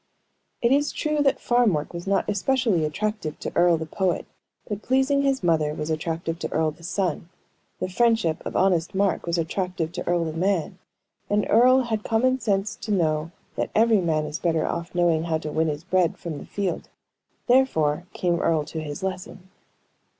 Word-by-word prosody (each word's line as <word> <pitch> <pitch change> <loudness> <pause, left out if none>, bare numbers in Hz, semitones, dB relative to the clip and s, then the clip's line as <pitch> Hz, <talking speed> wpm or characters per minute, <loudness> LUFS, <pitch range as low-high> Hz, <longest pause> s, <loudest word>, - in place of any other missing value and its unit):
It 235 - +4
is 290 +2 +3
true 305 -1 -1
that 275 -1 +2
farm 240 -4 +3
work 150 +2 -3
was 170 +2 -7
not 195 0 +1
especially 215 -3 +1
attractive 200 0 -3
to - - -4
Earle 175 -1 +4
the 160 - -4
poet, 180 +2 -1 0.4
but 205 -1 -4
pleasing 265 +3 +2
his 270 -5 0
mother 155 -3 +2
was 150 +1 -3
attractive 165 +1 -3
to - - -4
Earle 160 -1 +1
the 155 - -18
son; 175 -1 -2 0.5
the - - -1
friendship 220 -4 +1
of - - -6
honest 180 -2 +2
Mark 195 -2 +1
was 170 0 0
attractive 170 0 -2
to - - -6
Earle 175 -1 +1
the 160 - -4
man; 180 +1 -1 0.5
and 205 0 +2
Earle 255 +3 +5
had 220 -3 -2
common 255 +4 +2
sense 200 -2 0
to 215 - -5
know 160 -4 +1 0.3
that - - -2
every 220 -2 +4
man 155 -3 0
is 150 +1 -5
better 165 -2 +1
off 170 +1 -3
for - - -9
knowing 170 -2 +2
how 160 -1 0
to 155 -1 -6
win 160 +1 +1
his 150 0 -3
bread 185 -2 +1
from 160 -4 -6
the - - -11
field. 200 -3 -3 0.6
Therefore, 175 - +2
came 175 -2 0
Earle 160 -3 +1
to 160 - -5
his 145 +2 -6
lesson. 185 0 -5
180 Hz, 190 wpm, -24 LUFS, 160-215 Hz, 0.6 s, Earle